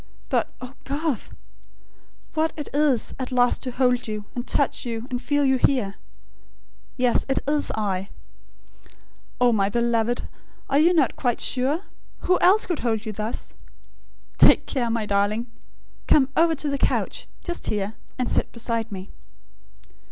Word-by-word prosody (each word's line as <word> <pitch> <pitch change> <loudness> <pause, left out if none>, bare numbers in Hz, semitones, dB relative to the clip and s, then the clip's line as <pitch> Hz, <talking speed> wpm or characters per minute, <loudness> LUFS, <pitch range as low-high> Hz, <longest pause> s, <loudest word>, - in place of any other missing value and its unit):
But, - - +1
oh, 255 0 -8
Garth! 285 -2 -3 1.0
What 320 0 +1
it 295 - -5
is, 285 -5 +2
at 260 0 -4
last 245 -1 +3
to 260 - -4
hold 250 -1 +1
you, 210 -1 -4
and 245 +1 -5
touch 285 - +1
you, 230 -1 -4
and 245 -1 -2
feel 290 +3 +1
you 265 -1 +3
here!... 245 -7 +1 1.0
Yes, 250 -2 +2
it 270 - +1
is 295 0 +1
I. 195 -3 -2 1.3
Oh, 245 -1 +5
my 200 -2 +2
beloved, 235 +1 0 0.4
are 280 - +4
you 335 +3 +5
not 310 -8 +2
quite 245 -3 0
sure? 275 +6 +1 0.4
Who 365 0 +2
else 390 +4 +5
could 345 -4 -2
hold 225 -2 -1
you 215 - -3
thus?... 215 +3 -4 0.9
Take - - +7
care, 245 -4 -1
my 225 -1 -1
darling! 205 +3 +1 0.6
Come 270 -3 +5
over 330 0 +4
to 295 - -2
the 280 -1 -1
couch, - - 0 0.2
just 345 -1 -3
here; 205 0 -1 0.2
and 250 -1 -1
sit - - 0
beside 230 -1 -2
me." 190 -1 -7
245 Hz, 150 wpm, -24 LUFS, 225-285 Hz, 1.3 s, Take